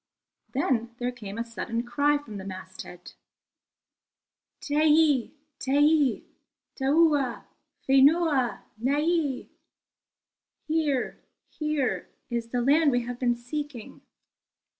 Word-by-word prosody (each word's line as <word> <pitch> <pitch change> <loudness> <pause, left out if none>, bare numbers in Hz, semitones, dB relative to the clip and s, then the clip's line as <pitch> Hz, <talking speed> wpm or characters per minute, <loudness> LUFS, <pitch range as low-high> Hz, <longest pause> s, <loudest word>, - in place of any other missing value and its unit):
Then 240 -5 0
there 245 0 -2
came 215 -4 -8
a 230 - -1
sudden 230 0 -4
cry 285 +5 +2
from 230 -8 -9
the 190 - -7
masthead: 185 -2 -9 1.5
"Teie 300 -3 +3 0.3
teie, 290 0 +3 0.5
taua 285 -3 +2 0.4
fenua, 275 - +4 0.2
nei!" 290 +2 0 1.2
"Here, 305 -5 -1 0.3
here 305 -4 -2 0.2
is 235 -1 -2
the 245 0 -1
land 290 +4 +4
we 245 -1 +1
have 245 +1 -6
been 240 -2 +2
seeking." 245 0 -7
265 Hz, 95 wpm, -27 LUFS, 240-295 Hz, 1.5 s, fenua